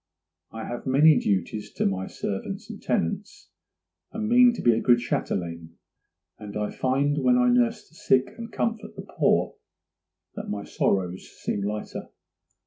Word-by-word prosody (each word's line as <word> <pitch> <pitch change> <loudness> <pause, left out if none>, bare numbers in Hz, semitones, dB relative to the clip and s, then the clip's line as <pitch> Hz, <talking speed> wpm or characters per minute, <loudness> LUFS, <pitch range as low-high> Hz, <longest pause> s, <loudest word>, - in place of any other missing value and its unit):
I 115 0 -6
have 120 +2 -6
many 145 +3 +6
duties 100 +2 -1
to - - -1
my 95 -1 -1
servants 95 -1 -5
and - - -10
tenants, 80 - -2 0.6
and 220 0 -3
mean 245 +1 +6
to - - -5
be 120 - +5
a 110 - 0
good 120 -1 +5
châtelaine; 85 -8 -3 0.7
and 105 0 -7
I 105 0 -2
find 140 +3 +1
when 250 0 +4
I 250 0 +4
nurse 235 -3 +2
the - - -27
sick 130 -5 +1
and 230 -1 -8
comfort 225 -1 -3
the - - -7
poor - - +1 0.8
that - - -7
my 105 0 -3
sorrows 95 -1 -1
seem 100 - -2
lighter. 105 +1 -4
120 Hz, 155 wpm, -26 LUFS, -, 0.8 s, many